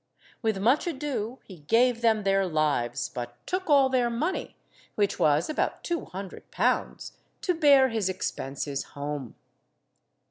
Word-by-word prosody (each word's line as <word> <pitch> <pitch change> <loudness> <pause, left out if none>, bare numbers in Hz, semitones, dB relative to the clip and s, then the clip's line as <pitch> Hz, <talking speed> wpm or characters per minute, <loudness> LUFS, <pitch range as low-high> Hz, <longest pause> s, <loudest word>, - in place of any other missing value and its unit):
With 220 -3 0
much 240 - +2
ado 265 -7 -3
he 185 - -12
gave 235 +10 +2
them 220 -2 +3
their 195 -1 +2
lives, 155 -7 0
but 120 -1 -7
took 370 -1 -3
all 280 -2 +6
their 255 -2 +1
money, 300 +11 -3 0.4
which 205 -1 0
was 150 +1 +3
about 310 - -2
two 345 -1 -2
hundred 190 +3 -9
pounds, - - -1 0.3
to 360 - +1
bear 285 -5 +5
his 220 -5 -1
expenses 140 -6 -3
home. 145 -3 -5
215 Hz, 140 wpm, -27 LUFS, -, 0.4 s, all